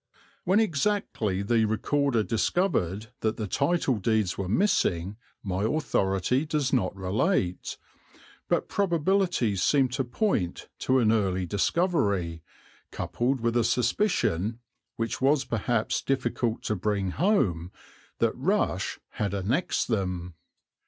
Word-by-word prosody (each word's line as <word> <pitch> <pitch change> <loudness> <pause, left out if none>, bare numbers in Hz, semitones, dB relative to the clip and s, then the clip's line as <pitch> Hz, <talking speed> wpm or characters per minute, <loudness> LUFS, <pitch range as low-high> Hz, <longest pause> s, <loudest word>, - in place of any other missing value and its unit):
When 190 +4 +4
exactly 155 - 0
the 115 +1 +2
Recorder 120 +2 +1
discovered 110 - 0
that 110 0 -1
the 110 - -2
title 140 - +1
deeds 110 -2 +1
were 95 -2 -4
missing 100 - +1 0.3
my 95 -1 -2
authority 110 - +1
does 150 -4 -1
not 100 -8 +1
relate, 95 - -1 0.7
but - - +1
probabilities 175 - +1
seem 135 -3 +3
to 135 +2 -1
point 120 - -1
to 130 - +2
an 115 -4 +4
early 95 -4 +1
discovery, 100 - 0 0.5
coupled 125 +1 -1
with 115 0 0
a 120 - +3
suspicion, 115 - +1 0.4
which 115 +2 -3
was 140 +1 +3
perhaps 115 0 0
difficult 125 -3 -1
to 110 - -1
bring 100 -1 -1
home, 95 - +1 0.5
that - - +1
Rush - - 0
had 100 -1 -2
annexed 110 - 0
them. 90 -5 -2
115 Hz, 120 wpm, -27 LUFS, 95-140 Hz, 0.7 s, When